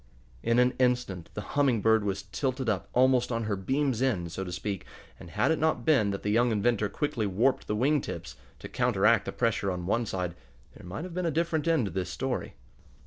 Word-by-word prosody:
In 115 0 +1
an 125 +1 +4
instant 125 -9 0
the 105 - -3
Humming 140 -5 +3
Bird 110 +1 +3
was 100 -1 -2
tilted 130 -1 -3
up 100 -4 -1
almost 125 -1 +3
on 115 -1 -1
her 105 -1 -1
"beams' 130 +5 0
ends," 90 -11 0
so 95 - -3
to 90 - -6
speak, 95 +2 -4 0.4
and 85 - -11
had 105 - +1
it 160 - +1
not 155 -6 +1
been 130 -10 +4
that 100 0 -4
the 105 - 0
young 120 +2 +3
inventor 110 -1 +1
quickly 120 -6 -1
warped 115 +8 +1
the 105 - -1
wing 140 +6 +2
tips, - - -7 0.2
to - - -8
counteract 110 -3 +2
the - - -3
pressure 115 -4 0
on 90 -2 -3
one 115 +5 0
side, 90 -3 -2 0.4
there - - -12
might 95 - -5
have 180 -1 -7
been 180 0 -1
a - - +2
different 165 0 0
end 160 -8 +3
to 95 - -4
this 90 0 -3
story. 130 +5 -3
115 Hz, 220 wpm, -28 LUFS, 100-130 Hz, 0.4 s, an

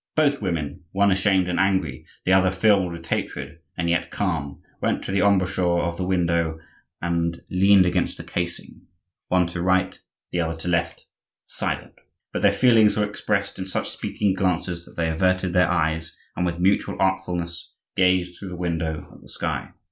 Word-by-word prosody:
Both 145 -4 +3
women, 85 -7 -2
one 100 +1 +4
ashamed 95 -1 +3
and 90 -1 -1
angry, 95 -8 0 0.2
the 95 - +4
other 95 0 +5
filled 95 -1 +3
with 85 0 -8
hatred 70 -1 -3 0.2
and 85 -2 -1
yet 85 +1 +1
calm, 80 -8 -3 0.2
went - - 0
to - - -4
the 95 - +1
embrasure 95 -3 +2
of 85 0 -2
the 90 - -2
window 85 -3 +1 0.5
and 85 0 0
leaned 95 +1 +6
against 90 - 0
the - - -7
casing, 85 -1 -5 0.5
one 90 -1 +3
to 85 0 -4
right, 95 +1 +1 0.3
the 90 - -1
other 80 0 -2
to - - -5
left, 85 -1 -1 0.4
silent; - - -4 0.4
but - - -2
their - - +5
feelings 115 -5 +5
were 105 - +3
expressed 100 -1 -2
in 95 - -4
such 95 - -2
speaking 100 -3 -1
glances 90 -2 -1
that - - -16
they 85 -1 0
averted 90 +2 +1
their 90 -1 +4
eyes 80 -1 0 0.2
and, 90 - 0
with 85 -1 -2
mutual 95 +3 +1
artfulness, 90 -3 -1 0.2
gazed 90 -1 +2
through 100 - -7
the 90 - -6
window 80 -3 -2
at - - -16
the - - -13
sky. - - -3
90 Hz, 180 wpm, -24 LUFS, 85-95 Hz, 0.5 s, leaned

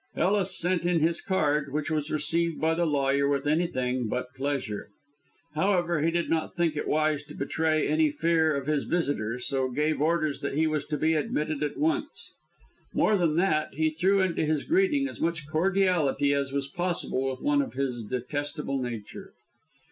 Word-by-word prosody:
Ellis 190 -1 +1
sent 175 0 +1
in 175 -1 +2
his 165 +2 +1
card, 150 -6 0
which 150 +2 -2
was 155 -1 -1
received 165 +2 0
by 160 +1 +2
the 170 +1 +1
lawyer 140 -1 +2
with 140 -1 0
anything 130 -6 0
but 125 +3 -3
pleasure. 135 -7 -3 0.6
However, 175 -1 +1
he 160 - +2
did 170 0 0
not 165 +2 -1
think 170 -3 +1
it 150 - -3
wise 155 -1 +1
to 150 - -11
betray 155 +2 0
any 315 0 +3
fear 165 - +2
of 140 -1 -3
his 150 -1 0
visitor, 130 -9 -1
so 130 +1 -1
gave 150 +2 0
orders 155 -2 +1
that 140 -1 -3
he 160 +2 +2
was 155 -1 -1
to 150 - -2
be 160 +2 +2
admitted 150 -1 -1
at 150 - -2
once. 325 +9 -2 0.6
More 215 - +3
than 170 -5 +1
that, 160 -3 +1
he 155 0 +1
threw 190 +5 +2
into 185 -4 0
his 155 -1 0
greeting 320 -5 +2
as - - -9
much 160 -3 -1
cordiality 165 -4 +2
as 140 -1 -1
was 140 0 -2
possible 170 -5 -1
with 130 - -6
one 290 -1 +3
of 270 - -5
his 125 -4 -2
detestable 140 +4 -3
nature. 115 -4 -7
155 Hz, 180 wpm, -27 LUFS, 140-170 Hz, 0.6 s, any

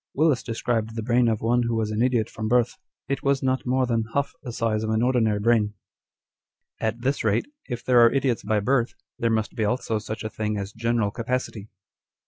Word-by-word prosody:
Willis 150 -3 +3
described 115 -1 -2
the 115 - -3
brain 120 +1 +3
of 110 -2 0
one 120 +2 +2
who 115 -1 0
was 110 -1 -1
an 110 +1 -1
idiot 120 -3 +2
from 110 0 -5
birth. 120 +1 +2 0.3
It 140 - -2
was 140 -1 +1
not 130 -1 0
more 130 +1 +2
than 115 -2 0
half 140 0 0
the 125 - -6
size 115 -2 0
of 110 - -2
an 110 +1 +1
ordinary 115 -5 +2
brain." 105 -1 +2 1.0
2 - - -2
At 115 +2 -3
this 135 +3 0
rate, 110 0 +2 0.2
if 120 -2 -5
there 125 -2 +6
are 115 - +6
idiots 135 -4 +1
by 105 0 0
birth, 125 +2 +1 0.2
there 115 - +1
must 110 -1 0
be 110 - 0
also 110 0 0
such 110 +1 -6
a 110 - -3
thing 105 -1 -2
as 100 0 -5
general 115 -2 0
capacity. 115 -3 -3
115 Hz, 215 wpm, -25 LUFS, 110-125 Hz, 1.0 s, there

